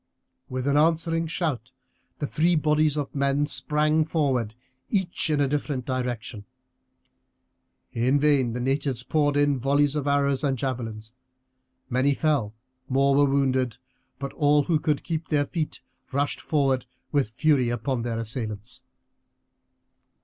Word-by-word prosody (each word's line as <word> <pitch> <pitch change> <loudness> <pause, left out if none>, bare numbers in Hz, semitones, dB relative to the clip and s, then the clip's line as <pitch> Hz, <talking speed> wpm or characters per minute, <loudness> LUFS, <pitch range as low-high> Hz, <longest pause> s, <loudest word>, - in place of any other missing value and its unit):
With 130 0 -3
an 140 +1 +3
answering 165 +1 +2
shout 145 -7 -3 0.4
the 145 - -2
three 170 +4 +2
bodies 150 -1 +2
of 145 -2 -3
men 140 +1 +1
sprang 150 +1 +1
forward, 135 -9 0 0.3
each 190 -5 0
in 150 -2 +1
a 140 - +3
different 140 -2 -2
direction. 125 -5 -3 1.5
In 125 +4 +2
vain 140 -5 +2
the 125 - -3
natives 135 0 -1
poured 145 -2 +1
in 145 -2 +2
volleys 140 +3 +2
of 145 -1 -2
arrows 140 -1 +2
and 135 -2 +1
javelins; 115 -4 -4 0.7
many 130 +2 +2
fell, 140 -10 0 0.3
more 135 +1 +3
were 140 0 +4
wounded, 130 -3 +1 0.4
but 140 0 -5
all 145 0 +3
who 160 +1 +1
could 150 -2 0
keep 165 -1 -3
their 145 -2 +1
feet 155 +1 -4 0.3
rushed 140 +1 -1
forward 135 -4 0 0.2
with 140 -7 +1
fury 140 -4 +3
upon 120 +2 -2
their 115 -1 -3
assailants. 110 0 -5
140 Hz, 135 wpm, -25 LUFS, 130-150 Hz, 1.5 s, were